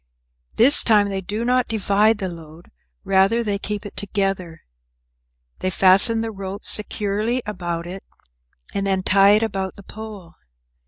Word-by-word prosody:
This 260 +6 +7
time 210 -3 +3
they 195 -1 -4
do 210 +5 -5
not 250 0 +1
divide 215 0 +1
the 195 -2 -4
load, 165 -1 -12 0.3
rather 195 +4 +2
they 205 -2 -2
keep 210 +1 -5
it 205 - -10
together. 195 -5 -3 1.0
They 185 - -2
fasten 195 +5 +5
the 225 0 -4
rope 195 0 -8
securely 210 +3 -1
about 175 -5 -5
it, 185 +2 -9 0.7
and 195 0 -2
then 190 -1 0
tie 195 +2 +4
it 215 +2 +3
about 195 -3 -4
the 200 - -14
pole. 205 -5 -11
200 Hz, 150 wpm, -20 LUFS, 190-215 Hz, 1.0 s, This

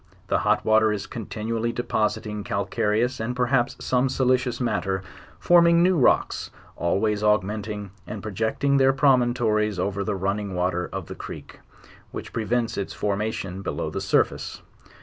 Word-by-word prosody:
The - - +2
hot - - +1
water 110 0 +4
is 105 -1 -3
continually 115 0 -3
depositing 105 -3 -1
calcareous, 105 +5 0
and 115 +3 -2
per 125 0 +1
haps, 120 -1 +1
some 130 +1 +2
silicious 130 -1 +1
matter, 95 -6 -1 0.3
forming 170 -1 +5
new 185 +1 +4
rocks, 135 -7 +2 0.3
always 105 +4 0
aug> 105 -2 +3
menting 105 0 -5 0.2
and 105 - -6
projecting 110 +7 0
their 135 0 +4
promontories 120 -6 +2
over 100 +2 -1
the 105 0 -2
running 100 +1 -2
water 90 0 -1
of - - -5
the - - -7
creek, - - -9 0.5
which - - -8
prevents 115 0 -1
its 100 - -4
formation 100 -2 -2
below - - -3
the - - -3
surface. - - 0
110 Hz, 150 wpm, -24 LUFS, 100-125 Hz, 0.5 s, forming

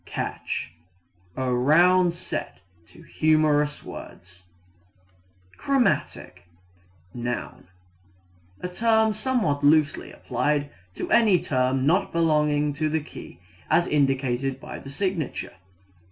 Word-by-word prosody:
Catch 80 - -4 0.6
a 130 -1 -1
round 170 +7 +4
set - - -6 0.3
to - - -17
humorous 150 -1 +1
words. 90 +1 -11 1.1
Chromatic 235 - -1 0.7
(noun) 120 -5 -5 0.9
a - - -3
term 220 +3 +2
somewhat 210 - -1
loosely 150 0 +2
applied 145 -1 -1 0.2
to - - -5
any 210 -6 +5
tone 130 -2 0
not 175 +6 +2
belonging 150 -3 +1
to 155 +2 -1
the 160 +1 0
key 90 - -12 0.3
as 170 +2 +3
indicated 135 -2 0
by - - -8
the 135 - -11
signature. 175 -1 -3
150 Hz, 100 wpm, -25 LUFS, 135-175 Hz, 1.1 s, any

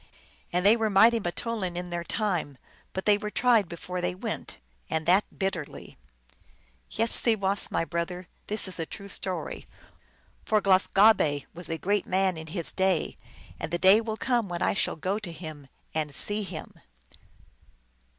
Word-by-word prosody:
And 180 +2 0
they 210 +3 +7
were 225 -2 0
mighty 225 +4 +6
m - - -3
teoulin 185 0 -3
in 175 0 -5
their 170 0 -3
time; 175 - -2 0.3
but 190 - -5
they 210 -1 +4
were 210 - -4
tried 225 -5 +3
before 180 +1 -5
they 180 +1 -1
went, 185 - -6 0.3
and 160 0 -1
that 190 +4 +4
bitterly. 190 -6 -4 0.9
Yes, 230 0 0
seewass, 200 -4 +1
my 165 - 0
brother, 175 +2 -4 0.2
this 210 -1 -1
is 185 - -6
a 165 - -3
true 200 -1 -9
story. 185 -1 -4 0.8
For 215 - +2
Glus 190 -1 +3
gah 210 +3 +7
be 145 -8 -1
was 175 -1 -2
a 165 - -2
great 200 +3 0
man 190 0 +2
in 160 0 -8
his 170 0 +1
day, 190 -3 0 0.4
and 160 - -4
the 175 - +1
day 190 +5 +6
will 220 -1 -4
come 240 -6 0
when 175 -1 -2
I - - +2
shall - - 0
go 185 +6 -2
to 200 -6 -7
him 155 -4 -9 0.3
and 150 -3 -2
see 205 - +1
him. 185 -6 -7
185 Hz, 175 wpm, -27 LUFS, 170-210 Hz, 0.9 s, they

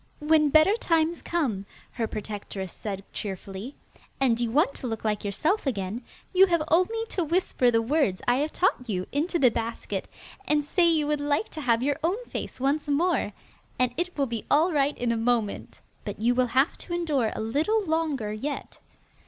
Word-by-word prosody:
'When 305 0 +3
better 310 +8 +5
times 330 -4 +1
come,' 235 - -1 0.2
her 230 -3 -2
protectress 205 -3 -6
said 195 -2 -5
cheerfully, 195 +5 -6 0.4
'and 245 -4 +2
you 240 -1 0
want 280 +4 +2
to 255 - -5
look 225 -1 -4
like 210 -1 0
yourself 305 - 0
again, 210 -1 -2 0.3
you 380 +1 +7
have 340 -3 +2
only 445 +7 +2
to 360 - -1
whisper 320 -6 +2
the 230 -1 +2
words 255 -7 +1
I 245 +1 +4
have 300 +3 0
taught 255 -9 0
you 185 -3 -1
into 325 +5 0
the 255 -7 +5
basket, 230 0 -3 0.4
and 295 -1 +2
say 340 +3 +3
you 315 -3 +2
would 295 0 0
like 290 +8 0
to 310 - -7
have 235 -3 +2
your 285 +1 0
own 355 +5 +1
face - - -6
once 285 +3 0
more, 330 +5 +1 0.5
and 250 -1 +1
it 355 0 -3
will 280 - +2
be 230 -4 -4
all 320 +5 +4
right 285 0 +1
in 240 -1 0
a 230 - 0
moment. 225 -2 -1 0.2
But - - -6
you 235 +3 +3
will 250 0 +2
have 275 +4 +3
to 345 - -4
endure 295 -10 0
a - - -4
little 310 - +1
longer 310 -10 -1
yet. 280 +7 -5
280 Hz, 190 wpm, -26 LUFS, 230-320 Hz, 0.5 s, you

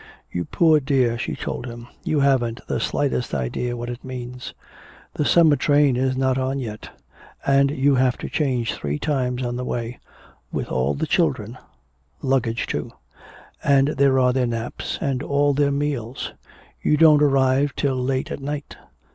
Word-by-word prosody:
"You 90 -1 -2
poor 160 -3 +4
dear," 130 -4 +1
she - - -3
told 130 - -5
him, 120 0 -9 0.2
"you 150 -2 +1
haven't 130 -4 +1
the - - -2
slightest 135 -4 -1
idea 120 - -2
what 120 0 -5
it 120 0 -6
means. 125 -1 -7 0.6
The 150 - -1
summer 160 -2 +5
train 145 -1 +3
is 130 +1 0
not 130 0 +1
on 130 +1 -1
yet, 110 -5 -6 0.6
and 140 0 +4
you 140 0 +2
have 130 -1 +2
to - - -6
change 130 -6 0
three 75 0 -3
times 130 - -1
on 120 0 -2
the 125 - -3
way 120 -1 -4 0.5
with - - -3
all 65 +2 0
the - - -1
children - - 0 0.7
luggage, 125 -4 0
too. - - -4 0.7
And 140 0 +4
there 140 -2 +3
are 125 -1 +3
their 130 -1 +1
naps, 115 0 -4
and 135 -4 -1
all 145 0 +2
their 140 0 +2
meals. 140 -4 -3 0.5
You 150 - +2
don't 155 -2 +6
arrive 135 0 +3
till 135 -2 0
late 130 +1 -1
at - - -4
night. 145 +1 -5
130 Hz, 165 wpm, -22 LUFS, 120-140 Hz, 0.7 s, don't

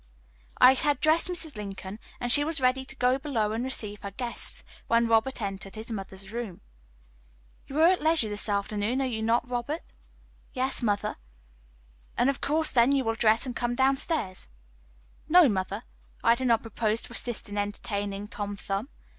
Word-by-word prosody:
I 255 - +8
had 290 +2 +1
dressed 315 +3 +4
Mrs. 330 -6 -2
Lincoln, 200 0 -7 0.2
and 245 0 0
she 290 - +7
was 320 0 0
ready 255 +1 +2
to 270 - -4
go 255 +1 +2
below 235 -8 -1
and 225 +2 -2
receive 210 -6 -2
her 200 - -5
guests, 235 +4 -2 0.2
when 230 0 +3
Robert 230 +4 +2
entered 195 0 -5
his 220 +2 -6
mother's 195 -2 -6
room. 230 -7 -5 1.1
"You 280 +3 -3
are - - +7
at 365 +1 +4
leisure 315 -6 +4
this 210 +1 -2
afternoon, 205 +4 -1
are 270 - +1
you 230 -4 -3
not, 230 +2 +1
Robert?" 250 +6 -4 0.6
"Yes, 260 +1 -1
mother." 205 -3 -1 1.0
"Of 275 +2 +1
course, 315 +2 +2
then, 240 +1 +4
you 275 -1 +2
will 225 -1 0
dress 225 +2 +3
and 250 -2 -5
come 240 +1 -1
down 265 +2 +3
stairs." 265 - -1 0.8
"No, 350 -1 +7
mother, 200 0 -2 0.4
I 230 - +6
do 260 +2 -3
not 230 -2 +3
propose 225 0 -1
to - - -5
assist 240 -1 -2
in 205 0 -4
entertaining 205 0 -3
Tom 205 -1 -5
Thumb. 200 +5 -4
235 Hz, 175 wpm, -27 LUFS, 205-265 Hz, 1.1 s, I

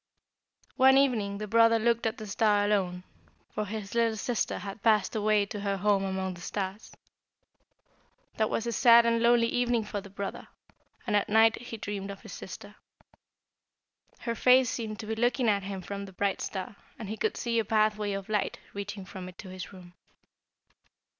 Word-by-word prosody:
One 265 +1 +6
evening 220 -8 +2
the 215 - -4
brother 230 +1 +5
looked 230 0 +1
at 220 - -3
the 215 - -7
star 205 0 +2
alone, 185 -3 0 0.5
for 215 - -2
his 205 -1 -6
little 230 -1 +1
sister 235 +2 -1
had 200 +1 -7
passed 215 -2 +2
away 210 -1 +2
to 205 +1 -6
her 200 -1 -1
home 200 0 +2
among 190 -1 -2
the 175 - -12
stars. 195 +3 -5 1.5
That 220 -1 +1
was 230 - -1
a 235 - -1
sad 235 -1 +6
and 230 0 +2
lonely 235 0 +5
evening 240 -1 +1
for 210 -1 -5
the 200 - -12
brother, 200 0 -6 0.6
and 215 -4 0
at 205 - +1
night 220 +1 +4
he 240 -2 -7
dreamed 205 -2 -5
of 200 -1 -8
his - - -10
sister. - - -9 1.4
Her 235 - -2
face 250 +2 +4
seemed 220 -3 -4
to - - -8
be 220 - -3
looking 240 +2 +1
at 200 -2 +3
him 195 -1 -6
from 200 +1 -5
the 190 - -12
bright 200 +1 -1
star, 200 +2 -5 0.2
and 220 - -7
he 215 - -4
could 440 - -1
see 235 -1 0
a - - +1
pathway 215 -1 +1
of 195 -1 -5
light 210 -2 -1 0.2
reaching 200 -1 -6
from 185 -1 -8
it 185 - -15
to 190 - -10
his 185 -2 -8
room. 180 -2 -13
210 Hz, 185 wpm, -29 LUFS, 200-230 Hz, 1.5 s, One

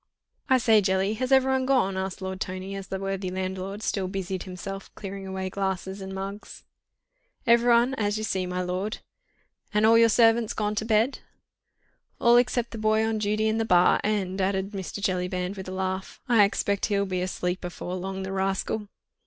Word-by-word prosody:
"I 260 - +6
say, 225 -3 +4
Jelly, 190 +1 +1
has 255 +4 -3
everyone 265 -1 +3
gone?" 250 -8 +2
asked 190 +1 -4
Lord 190 +1 -5
Tony, 185 +1 -4
as 195 -1 -6
the 190 - -3
worthy 195 -1 -3
landlord 190 +2 -4
still 190 -2 -1
busied 190 -1 -4
himself 195 +1 -7
clearing 195 -1 -7
away 190 0 -4
glasses 190 0 -3
and 190 0 -6
mugs. 195 +2 -7 0.8
"Everyone, 235 +2 +4
as 205 0 0
you 215 - -3
see, 190 -3 -1
my 180 0 -2
lord." 185 +4 -2 0.8
"And 210 +1 +4
all 230 +1 +6
your 230 0 +6
servants 225 0 +4
gone 210 -1 -1
to 215 +1 -2
bed?" 225 +4 +2 1.0
"All 235 0 +6
except 245 -1 +1
the 225 - -6
boy 215 0 +2
on 220 -1 -1
duty 215 +1 +1
in 220 +1 +1
the - - +2
bar, 180 -5 +4
and," 195 -2 -1
added 190 +1 0
Mr. 195 0 -5
Jellyband 180 0 -1
with 190 -1 -7
a - - -5
laugh, 190 0 -3
"I 230 -4 +6
expect 200 0 0
he'll 200 -2 +1
be 185 -2 -2
asleep 180 0 -2
afore 180 0 -5
long, 190 +1 -4
the 190 - -5
rascal." 195 +2 -1
195 Hz, 185 wpm, -26 LUFS, 190-220 Hz, 1.0 s, I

